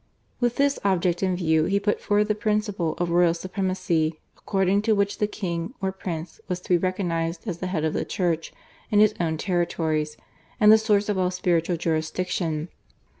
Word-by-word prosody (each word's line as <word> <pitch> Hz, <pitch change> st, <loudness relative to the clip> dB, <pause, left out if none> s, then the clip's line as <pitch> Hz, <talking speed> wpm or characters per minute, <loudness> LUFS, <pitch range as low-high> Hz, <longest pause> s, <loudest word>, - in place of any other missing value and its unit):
With 240 Hz, -1 st, +1 dB
this 280 Hz, 0 st, +2 dB
object 180 Hz, -3 st, +1 dB
in 185 Hz, -2 st, +1 dB
view 160 Hz, -3 st, +2 dB
he 200 Hz, +3 st, +1 dB
put 205 Hz, +1 st, 0 dB
forward 205 Hz, 0 st, +2 dB
the 210 Hz, -, +2 dB
principle 210 Hz, -5 st, -1 dB
of 175 Hz, -1 st, -1 dB
royal 170 Hz, -1 st, +4 dB
supremacy, 185 Hz, -3 st, -1 dB, 0.2 s
according 195 Hz, 0 st, +1 dB
to 215 Hz, 0 st, +2 dB
which 200 Hz, 0 st, 0 dB
the 210 Hz, -, +2 dB
king 180 Hz, +1 st, -4 dB
or 190 Hz, -1 st, -1 dB
prince 175 Hz, -3 st, -6 dB
was 180 Hz, -1 st, -2 dB
to -, -, -15 dB
be 180 Hz, -, +5 dB
recognised 170 Hz, -1 st, -2 dB
as 175 Hz, -4 st, -3 dB
the 185 Hz, -, -3 dB
head 165 Hz, -4 st, -1 dB
of 155 Hz, -, 0 dB
the -, -, -1 dB
church 170 Hz, -5 st, -1 dB, 0.4 s
in 210 Hz, -2 st, +3 dB
his 215 Hz, 0 st, +5 dB
own 160 Hz, -2 st, 0 dB
territories, 160 Hz, -4 st, -1 dB, 0.4 s
and 210 Hz, -2 st, +7 dB
the 220 Hz, -, +8 dB
source 210 Hz, -2 st, +2 dB
of 205 Hz, -3 st, 0 dB
all 180 Hz, -1 st, +2 dB
spiritual 175 Hz, -1 st, 0 dB
jurisdiction. 160 Hz, 0 st, -2 dB
180 Hz, 185 wpm, -25 LUFS, 165-200 Hz, 0.4 s, the